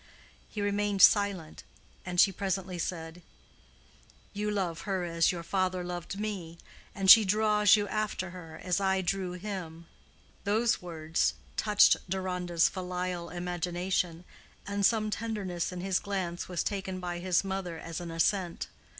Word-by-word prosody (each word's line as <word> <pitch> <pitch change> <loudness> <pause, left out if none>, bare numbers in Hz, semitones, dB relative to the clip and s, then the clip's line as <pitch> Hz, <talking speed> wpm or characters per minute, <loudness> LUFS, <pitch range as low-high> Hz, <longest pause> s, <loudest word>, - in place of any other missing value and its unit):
He 210 - -4
remained 205 -1 +1
silent, 200 -6 +4 0.5
and 180 0 -2
she 195 - +7
presently 190 -1 -3
said, 165 0 -4 1.1
"You 210 +1 -2
love 185 -5 -2
her 190 -2 0
as 165 -1 +2
your 170 -2 -5
father 185 +1 -1
loved 175 +2 -5
me, 190 -6 -4 0.4
and 195 -2 -2
she 220 +4 +11
draws 210 +1 +4
you 205 -1 -1
after 205 -3 -2
her 165 -3 -10
as 180 +2 0
I 190 -1 +2
drew 185 0 -2
him." 175 -3 -6 0.6
Those 220 +4 +1
words 165 -2 -1 0.2
touched 210 -1 +5
Deronda's 180 -2 +1
filial 180 -2 -4
imagination, 175 0 -2 0.4
and 200 0 -2
some 215 +1 +3
tenderness 200 -6 -3
in 180 -1 -6
his 190 0 +1
glance 185 -4 -4
was 180 -2 -1
taken 190 -2 -3
by 175 -1 -4
his 180 0 +1
mother 190 -3 -4
as 165 +1 -6
an 175 - -6
assent. 170 +2 0
185 Hz, 140 wpm, -30 LUFS, 175-200 Hz, 1.1 s, she